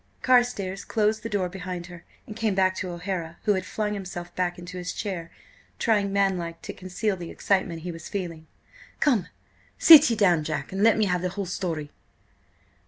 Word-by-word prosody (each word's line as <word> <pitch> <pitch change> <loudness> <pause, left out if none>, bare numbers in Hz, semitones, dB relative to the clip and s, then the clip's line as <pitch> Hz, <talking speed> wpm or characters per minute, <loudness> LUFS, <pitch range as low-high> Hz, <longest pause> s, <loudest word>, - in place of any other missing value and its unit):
Carstares 245 -7 +2
closed 215 0 0
the 230 - -5
door 200 -4 0
behind 180 -1 -6
her 175 -1 -12 0.2
and 215 - -9
came 220 -3 0
back 185 -1 +3
to 185 - -4
O'Hara, 175 -1 -4
who 210 - +3
had 185 -1 -3
flung 210 -1 -2
himself 180 -3 -6
back 180 -1 -1
into 180 +1 -8
his 180 0 -4
chair, 180 -5 -4 0.5
trying, 205 -3 +1
manlike, 185 -4 0
to - - -6
conceal 190 +3 -2
the 175 -2 -8
excitement 180 -5 -1
he 180 - -4
was 165 -1 -9
feeling. 165 -5 -5 0.5
"Come, 235 - +2 0.5
sit 310 -4 +9
ye 230 - +1
down, 180 -7 +3
Jack, 150 -2 -4
and 195 +1 -3
let 225 0 +5
me 215 - +3
have 180 -2 0
the 180 - -1
whole 200 +2 -4
story!" 165 -5 -4
185 Hz, 185 wpm, -26 LUFS, 175-210 Hz, 0.5 s, sit